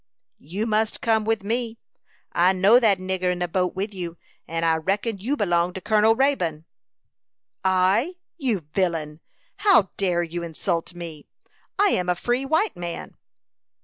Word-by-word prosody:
"You 190 Hz, +9 st, -4 dB
must 220 Hz, 0 st, 0 dB
come 220 Hz, -2 st, +1 dB
with 225 Hz, -2 st, 0 dB
me. 230 Hz, +2 st, -2 dB, 0.5 s
I 180 Hz, +2 st, +4 dB
know 200 Hz, +6 st, +6 dB
that 215 Hz, -5 st, +4 dB
nigger 185 Hz, -1 st, -1 dB
in 180 Hz, -, -2 dB
the 175 Hz, 0 st, -1 dB
boat 180 Hz, +1 st, -1 dB
with 200 Hz, +3 st, -3 dB
you, 175 Hz, -3 st, -6 dB, 0.3 s
and 165 Hz, 0 st, -2 dB
I 165 Hz, -1 st, +3 dB
reckon 200 Hz, +6 st, -1 dB
you 260 Hz, +9 st, -1 dB
belong 175 Hz, -4 st, +1 dB
to 190 Hz, -, -5 dB
Colonel 215 Hz, +2 st, +3 dB
Raybone." 180 Hz, -, 0 dB, 1.0 s
"I, 190 Hz, -, +2 dB, 0.2 s
you 250 Hz, -, -1 dB
villain! 165 Hz, -5 st, -1 dB, 0.4 s
How 380 Hz, -, +4 dB
dare 180 Hz, -3 st, +1 dB
you 170 Hz, +1 st, -5 dB
insult 170 Hz, +1 st, -3 dB
me? 165 Hz, -4 st, -8 dB, 0.5 s
I 410 Hz, 0 st, +4 dB
am 180 Hz, -, 0 dB
a 180 Hz, -, +2 dB
free 245 Hz, +8 st, -1 dB
white 320 Hz, +9 st, +1 dB
man." 175 Hz, -1 st, -6 dB
190 Hz, 155 wpm, -24 LUFS, 175-225 Hz, 1.0 s, know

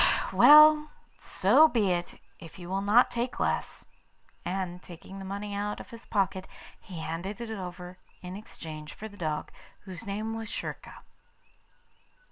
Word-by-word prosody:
'Well, 305 Hz, 0 st, +8 dB, 0.3 s
so 245 Hz, +12 st, +4 dB
be 215 Hz, -10 st, +1 dB
it, 175 Hz, 0 st, -3 dB, 0.2 s
if 165 Hz, +1 st, -12 dB
you 175 Hz, -1 st, -9 dB
will 195 Hz, +1 st, -1 dB
not 210 Hz, +5 st, +4 dB
take 240 Hz, +1 st, -3 dB
less;' -, -, -2 dB, 0.6 s
and, 180 Hz, -1 st, -4 dB
taking 185 Hz, +3 st, -11 dB
the 195 Hz, -, -7 dB
money 200 Hz, +1 st, -5 dB
out 205 Hz, +1 st, -3 dB
of -, -, -11 dB
his 230 Hz, 0 st, -12 dB
pocket, 190 Hz, -2 st, -1 dB, 0.3 s
he 175 Hz, -4 st, -9 dB
handed 170 Hz, +6 st, -5 dB
it 235 Hz, -2 st, -6 dB
over 180 Hz, -2 st, -7 dB, 0.2 s
in 180 Hz, +1 st, -7 dB
exchange 155 Hz, -7 st, -9 dB
for 220 Hz, -, -7 dB
the 205 Hz, -, -14 dB
dog, 155 Hz, -5 st, -3 dB, 0.3 s
whose 190 Hz, +2 st, -9 dB
name 215 Hz, +3 st, -3 dB
was 225 Hz, 0 st, -6 dB
Schurka. -, -, -7 dB
195 Hz, 150 wpm, -28 LUFS, 180-220 Hz, 0.6 s, Well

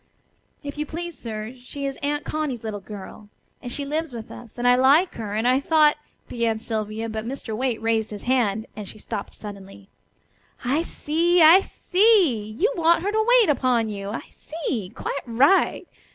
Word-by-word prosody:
"If 285 Hz, +1 st, -7 dB
you 300 Hz, -, -2 dB
please, 340 Hz, +1 st, -6 dB
sir, 220 Hz, -2 st, -6 dB
she 280 Hz, +3 st, -6 dB
is 275 Hz, -1 st, -3 dB
Aunt 290 Hz, +1 st, -2 dB
Connie's 295 Hz, -7 st, -3 dB
little 215 Hz, -2 st, -4 dB
girl, 205 Hz, +1 st, -10 dB, 0.3 s
and 245 Hz, -, -6 dB
she 285 Hz, +1 st, -3 dB
lives 310 Hz, +1 st, -2 dB
with 230 Hz, -2 st, -8 dB
us, 235 Hz, -1 st, -12 dB
and 245 Hz, 0 st, 0 dB
I 245 Hz, -, +7 dB
like 280 Hz, +8 st, +4 dB
her, 210 Hz, -3 st, -5 dB
and 220 Hz, +3 st, +1 dB
I 255 Hz, +1 st, +4 dB
thought 300 Hz, +1 st, +4 dB, 0.2 s
" -, -, -43 dB
began 230 Hz, -2 st, -1 dB
Sylvia, 220 Hz, 0 st, -3 dB
but 220 Hz, -1 st, -4 dB
Mr. 235 Hz, -2 st, -5 dB
Waite 245 Hz, -1 st, -1 dB
raised 225 Hz, -1 st, +1 dB
his 205 Hz, -2 st, -8 dB
hand, 225 Hz, -4 st, +1 dB
and 210 Hz, -2 st, -7 dB
she -, -, -11 dB
stopped 205 Hz, -1 st, -6 dB
suddenly. 200 Hz, -1 st, -10 dB, 0.8 s
"I 275 Hz, +6 st, +2 dB
see! 340 Hz, +1 st, +2 dB
I 330 Hz, +4 st, +9 dB
see! 360 Hz, -, +2 dB
You 440 Hz, +6 st, +2 dB
want 335 Hz, 0 st, +3 dB
her 405 Hz, -, 0 dB
to 435 Hz, +1 st, +1 dB
wait 425 Hz, -, +2 dB
upon 245 Hz, -5 st, +1 dB
you. 200 Hz, -1 st, -5 dB
I 215 Hz, -, -4 dB
see. 255 Hz, -, -5 dB
Quite 275 Hz, -, -3 dB
right. 265 Hz, +11 st, +3 dB
250 Hz, 185 wpm, -24 LUFS, 220-310 Hz, 0.8 s, I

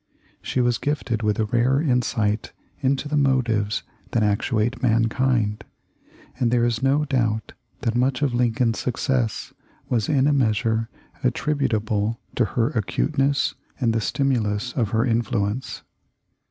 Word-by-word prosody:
She 130 Hz, -, -1 dB
was 120 Hz, -1 st, +1 dB
gifted 135 Hz, -6 st, -1 dB
with 105 Hz, -1 st, +1 dB
a 110 Hz, -, +1 dB
rare 120 Hz, +5 st, +2 dB
insight 120 Hz, -7 st, 0 dB, 0.3 s
into 140 Hz, +1 st, 0 dB
the 150 Hz, -, -2 dB
motives 120 Hz, -7 st, +1 dB, 0.3 s
that 115 Hz, -, +2 dB
actuate 105 Hz, +3 st, 0 dB
mankind, 115 Hz, -2 st, +1 dB, 0.8 s
and 120 Hz, -3 st, +2 dB
there 120 Hz, 0 st, +3 dB
is 115 Hz, -2 st, 0 dB
no 140 Hz, +3 st, +2 dB
doubt 115 Hz, -6 st, -1 dB, 0.3 s
that 115 Hz, -, 0 dB
much 125 Hz, +3 st, +1 dB
of 135 Hz, -4 st, +1 dB
Lincoln's 120 Hz, -1 st, +1 dB
success 125 Hz, -2 st, -1 dB, 0.4 s
was 115 Hz, -4 st, 0 dB
in 140 Hz, -3 st, +3 dB
a 145 Hz, -, +3 dB
measure 115 Hz, -3 st, +1 dB, 0.3 s
attributable 110 Hz, -6 st, 0 dB
to 120 Hz, -, +2 dB
her 115 Hz, +1 st, 0 dB
acuteness 135 Hz, -, 0 dB, 0.3 s
and 115 Hz, -4 st, +2 dB
the 115 Hz, -, 0 dB
stimulus 125 Hz, -3 st, 0 dB
of 115 Hz, -5 st, 0 dB
her 115 Hz, +3 st, +1 dB
influence. 115 Hz, 0 st, -1 dB
120 Hz, 135 wpm, -23 LUFS, 110-130 Hz, 0.8 s, there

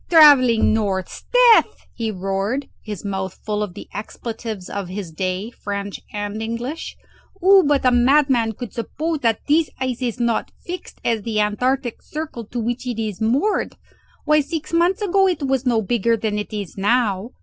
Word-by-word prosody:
Travelling 280 Hz, -10 st, +7 dB
north! 195 Hz, -4 st, 0 dB
'sdeath!" -, -, +4 dB, 0.2 s
he 230 Hz, -2 st, -3 dB
roared, 195 Hz, +7 st, -2 dB
his 210 Hz, -2 st, -7 dB
mouth 190 Hz, -2 st, -4 dB
full 210 Hz, -1 st, -1 dB
of 200 Hz, -4 st, -4 dB
the -, -, -9 dB
expletives 220 Hz, -1 st, -6 dB
of 200 Hz, -2 st, -4 dB
his 185 Hz, -3 st, -5 dB
day, 185 Hz, +6 st, -3 dB
French 200 Hz, -3 st, -5 dB
and 205 Hz, +1 st, -4 dB
English. 235 Hz, +7 st, -4 dB, 0.4 s
"Who 385 Hz, +1 st, +6 dB
but 285 Hz, -2 st, +2 dB
a 255 Hz, -, +6 dB
madman 245 Hz, -2 st, +3 dB
could 240 Hz, +2 st, -8 dB
suppose 310 Hz, +7 st, -3 dB
that 230 Hz, -5 st, 0 dB
this 310 Hz, +2 st, +3 dB
ice 255 Hz, -1 st, -2 dB
is 245 Hz, -1 st, -2 dB
not 235 Hz, -1 st, 0 dB
as -, -, -32 dB
fixed 360 Hz, +1 st, -7 dB
as 230 Hz, -2 st, +1 dB
the 215 Hz, 0 st, -2 dB
antarctic 245 Hz, +4 st, 0 dB
circle 300 Hz, -7 st, -6 dB
to 240 Hz, +4 st, -5 dB
which 240 Hz, +2 st, -3 dB
it 240 Hz, -2 st, -3 dB
is 215 Hz, -2 st, -3 dB
moored? 270 Hz, -, +1 dB, 0.5 s
Why, 305 Hz, 0 st, +4 dB
six 315 Hz, +3 st, -5 dB
months 360 Hz, +5 st, +2 dB
ago 390 Hz, 0 st, +3 dB
it 355 Hz, -5 st, -1 dB
was 270 Hz, -1 st, 0 dB
no 230 Hz, -3 st, +2 dB
bigger 230 Hz, +1 st, +1 dB
than 210 Hz, -1 st, -1 dB
it 210 Hz, -, -6 dB
is 205 Hz, -4 st, -5 dB
now!" 210 Hz, 0 st, +1 dB
230 Hz, 175 wpm, -21 LUFS, 210-280 Hz, 0.5 s, Travelling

